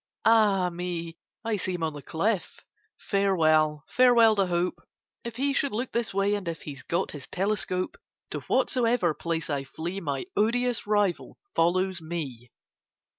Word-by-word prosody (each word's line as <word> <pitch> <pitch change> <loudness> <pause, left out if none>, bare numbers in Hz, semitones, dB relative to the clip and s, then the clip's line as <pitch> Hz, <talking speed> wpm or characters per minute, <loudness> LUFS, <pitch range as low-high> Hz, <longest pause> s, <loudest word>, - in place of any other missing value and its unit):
Ah 205 -5 +4
me! 170 -1 -4 0.3
I 225 -2 0
see 185 -1 -2
him 170 - -4
on 160 -1 -1
the 145 - -8
cliff! 195 +7 -2 0.4
Farewell, 155 -7 +2
farewell 235 -3 +5
to 195 -2 +3
hope, 175 +1 -1 0.4
If 235 -1 -6
he 275 +3 +1
should 280 -2 0
look 240 +4 -2
this 235 -1 -1
way, 195 +1 +1
and 200 -4 -3
if 165 -1 -4
He's 140 -3 -7
got 170 +7 -1
his 145 -3 -8
telescope! 185 -1 -1 0.3
To - - -3
whatsoever 230 -9 +2
place 165 +2 -2
I 140 -2 -1
flee, 170 +7 -5
My 140 -5 -3
odious 240 +2 +1
rival 205 -4 0 0.2
follows 185 +2 +1
me! 145 -8 -5
185 Hz, 155 wpm, -27 LUFS, 165-215 Hz, 0.4 s, farewell